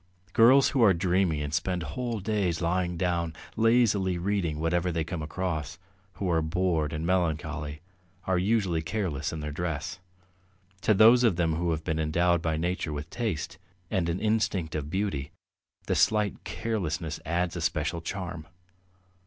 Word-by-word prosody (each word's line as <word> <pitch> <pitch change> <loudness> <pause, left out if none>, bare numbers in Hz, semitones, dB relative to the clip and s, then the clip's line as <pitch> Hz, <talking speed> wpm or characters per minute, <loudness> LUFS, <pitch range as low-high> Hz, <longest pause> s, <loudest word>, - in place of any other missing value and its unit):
Girls 130 +4 +6
who 135 - +1
are 100 -5 +6
dreamy 90 -3 +1
and 75 +1 -4
spend 90 +1 -1
whole 115 - -3
days 95 -5 0
lying 90 +1 0
down, 85 -2 -1 0.2
lazily 110 -5 +3
reading 90 -4 -1
whatever 85 +2 +1
they 80 -1 -1
come 85 +1 -5
across, 80 -1 -3 0.4
who 95 +4 -3
are 85 -2 +2
bored 80 -2 0
and 80 0 -3
melancholy, 80 -4 -1 0.4
are 95 -1 +1
usually 95 -4 +1
careless 80 -5 -2
in 80 - -5
their 75 0 -4
dress. 80 +1 -3 0.8
To 110 - +3
those 115 +4 +7
of 115 -7 +4
them 85 -2 +1
who 85 +2 -1
have 80 -1 -1
been 80 0 -1
endowed 85 +2 +2
by 80 -2 0
nature 85 0 -2
with 75 +2 -5
taste 85 -9 -3 0.3
and 85 -3 0
an 85 +2 -1
instinct 105 -7 0
of 75 -1 -3
beauty, 85 -6 -2 0.5
the - - 0
slight 105 -2 +2
carelessness 85 -8 -3
adds 85 +2 -1
a 85 - -3
special 80 +1 -1
charm. 85 -3 -5
85 Hz, 160 wpm, -28 LUFS, 80-95 Hz, 0.8 s, those